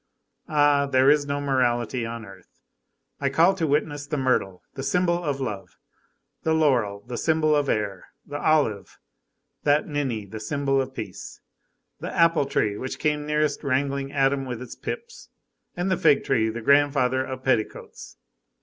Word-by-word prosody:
Ah! 145 -2 +3
there 135 +1 +5
is 145 -1 +2
no 140 0 -1
morality 125 -3 0
on 115 -1 -6
earth. 100 - -16 0.6
I 140 - 0
call 165 +8 +4
to 170 -4 -1
witness 145 0 -1
the 150 0 -2
myrtle, 125 -9 0
the 135 - -6
symbol 175 +2 +1
of 145 -3 -2
love, 105 -7 -5 0.6
the 160 0 +1
laurel, 120 -10 +1
the 120 - -5
symbol 155 -1 +2
of 145 -2 +1
air, 100 -3 -2 0.2
the 145 +1 -6
olive, 145 -11 +1 0.6
that 145 +1 +2
ninny, 135 -8 -2
the 110 +2 -8
symbol 135 +3 0
of 130 0 -6
peace, 105 -5 -7 0.6
the - - -5
apple 165 -4 +3
tree 105 -5 0
which 130 - -5
came 150 -1 -1
nearest 150 -1 0
rangling 140 0 -1
Adam 135 -1 +1
with 125 -3 -5
its 125 -1 -8
pips, 470 0 -7 0.5
and 180 +2 -1
the 185 - +2
fig 150 -4 +4
tree, 115 -5 +1
the 115 +2 -5
grandfather 140 -1 +3
of 130 0 -7
petticoats. 115 -5 -2
140 Hz, 160 wpm, -25 LUFS, 120-150 Hz, 0.6 s, there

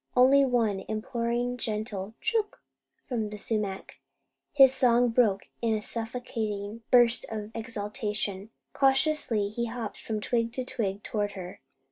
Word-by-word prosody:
Only 270 +3 +7
one 230 -6 +1
imploring, 240 +2 -2
gentle 215 -2 -4
"Chook!" 435 -2 0 0.5
from 225 -5 -2
the 210 - -7
sumac! 205 -2 -3 0.5
His 270 -2 +7
song 245 -2 +4
broke 225 -4 +3 0.2
in 225 -2 +2
a - - -1
suffocating 225 -2 -4
burst 240 -1 +5
of 215 -1 -5
exultation. 210 -3 -3 0.2
Cautiously 270 -6 +2
he 235 +3 -2
hopped 225 -2 -6
from 220 -1 -3
twig 230 +1 0
to 255 0 -3
twig 205 -6 -3
toward 205 -2 -2
her. 185 -2 -8
225 Hz, 130 wpm, -28 LUFS, 210-245 Hz, 0.5 s, Only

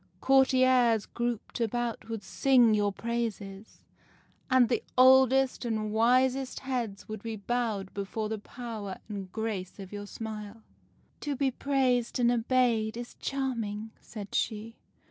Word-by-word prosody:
Courtiers 255 -4 +4
grouped 240 -1 -4
about 235 0 -2
would 225 -3 -4
sing 245 +2 +4
your 205 -1 +2
praises, 220 -3 -5 0.7
and 255 -2 +5
the 240 - 0 0.2
oldest 265 +1 +5
and 215 -3 -2
wisest 255 +3 +2
heads 240 -7 -3
would 215 -2 -6
be 225 0 -4
bowed 215 -3 -2
before 205 +2 -3
the 220 0 -3
power 215 -4 -7
and 200 -3 -6
grace 215 -4 -4
of 195 -1 -9
your 205 0 -6
smile.' 215 0 -7 0.6
'"To 290 -1 -3
be 270 0 +1
praised 255 -3 +1
and 240 -1 +3
obeyed 235 -2 +1
is 240 0 -7
charming,' 225 -6 -3
said 205 -3 -9
she. 225 +1 -2
230 Hz, 130 wpm, -29 LUFS, 210-255 Hz, 0.7 s, and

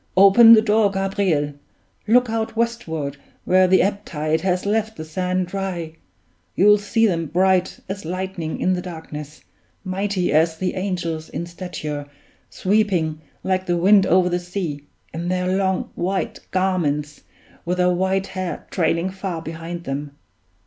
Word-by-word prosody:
Open 200 +4 +9
the 220 -1 +6
door, 215 -1 +3
Gabriel! 195 -6 0 0.5
look 245 +3 +4
out 225 0 -2
westward, 165 - -2 0.3
where 185 0 +4
the 185 0 +5
ebb 200 +1 -1
tide 155 -2 -1
has 180 0 0
left 220 +1 0
the 155 - -6
sand 180 +3 -1
dry. 180 -3 -4 0.6
You'll 210 +2 +5
see 225 +3 +1
them 165 -6 0
bright 185 +3 +1
as 195 +1 -5
lightning 180 -1 -4
in 185 - +2
the 180 - -2
darkness, 155 -4 -8 0.4
mighty 190 -1 -1
as 160 +1 +3
the 185 +1 -2
angels 175 -4 -3
in 170 - -4
stature, 170 -5 -6 0.4
sweeping 185 -6 0 0.2
like 185 0 -1
the 175 0 +1
wind 195 +3 +5
over 180 +1 +4
the 175 0 0
sea, 175 -5 -5 0.3
in 170 +2 -4
their 185 +1 0
long 190 -1 0
white 190 +2 -2
garments, 150 -6 -1 0.4
with 180 +1 -2
their 180 0 +3
white 190 +2 0
hair 185 -2 -5
trailing 170 +1 0
far 190 -3 -4
behind 165 +1 -6
them! 145 0 -5
185 Hz, 150 wpm, -22 LUFS, 165-195 Hz, 0.6 s, Open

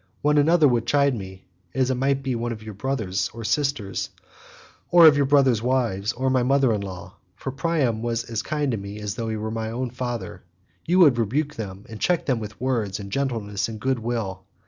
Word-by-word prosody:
When 150 0 +4
another 160 +1 +5
would 120 -3 +1
chide 140 -1 +3
with 115 - -3
me, 95 -1 -10 0.3
as 130 -1 +2
it - - +2
might 135 +2 0
be 130 -1 -1
one 120 0 -2
of 110 -2 -7
your 110 -1 -7
brothers 100 -5 -2
or 115 - -6
sisters 135 -5 -1 0.8
or 170 -1 +8
of 155 -2 +9
your 140 -1 +2
brothers' 135 -5 +4
wives, 115 -5 0
or 130 +1 0
my 130 -1 +3
mother 135 -1 +3
in 105 - -1
law—for 95 +3 -8
Priam 135 -6 0
was 115 0 -1
as 115 -1 -3
kind 150 -2 -1
to 115 - -2
me 100 +1 -7
as 105 -1 -3
though 115 0 -4
he 110 - -2
were 110 +1 -4
my 110 0 -3
own 120 +2 -3
father—you 125 +7 -5
would 145 -10 +6
rebuke 140 +6 -1
and 105 +1 -7
check 180 -2 +1
them 130 -4 +1
with 105 -1 -8
words 115 -7 -1
of 100 -1 -7
gentleness 115 -6 -2
and 110 -1 -7
goodwill. 115 -6 -2
120 Hz, 205 wpm, -24 LUFS, 105-135 Hz, 0.8 s, of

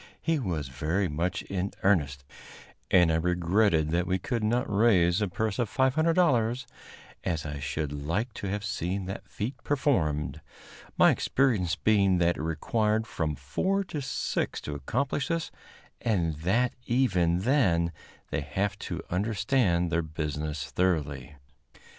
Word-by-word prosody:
He 165 -2 0
was 85 - -2
very 80 +9 -1
much 85 +5 -2
in 95 0 -3
earnest, 70 -9 +2 0.7
and 90 -3 +5
I 80 - +2
regretted 90 -1 +2
that 85 +1 +1
we 95 - +1
could 115 +4 -2
not 120 +4 +1
raise 100 -4 +3
a 105 - +1
purse 110 +4 -2
of 120 -4 0
$500, 130 -4 +2 0.6
as 80 -4 -2
I 75 -2 -5
should 70 +1 -3
like 85 - -2
to 100 - -5
have 100 +1 -3
seen 95 -1 -2
the 95 +1 -5
feat 115 +7 -5
performed 90 - 0 0.6
my - - +7
experience 110 - +1
being 100 -4 +3
that 85 0 +2
it - - -4
required 105 +7 0
from 80 -8 -2
four 190 - -1
to 150 - -2
six 135 - -2
to 75 - -5
accomplish 130 - -1
this, 165 -1 -2 0.5
and 90 -8 +1
that 110 +10 +1
even 90 -9 +2
then 95 - +2 0.4
they 80 - -1
have 95 +8 -2
to 85 -2 -5
understand 100 -2 +1
their 85 +1 +2
business 75 -2 -4
thoroughly. 75 -5 -1
95 Hz, 140 wpm, -28 LUFS, 80-115 Hz, 0.7 s, my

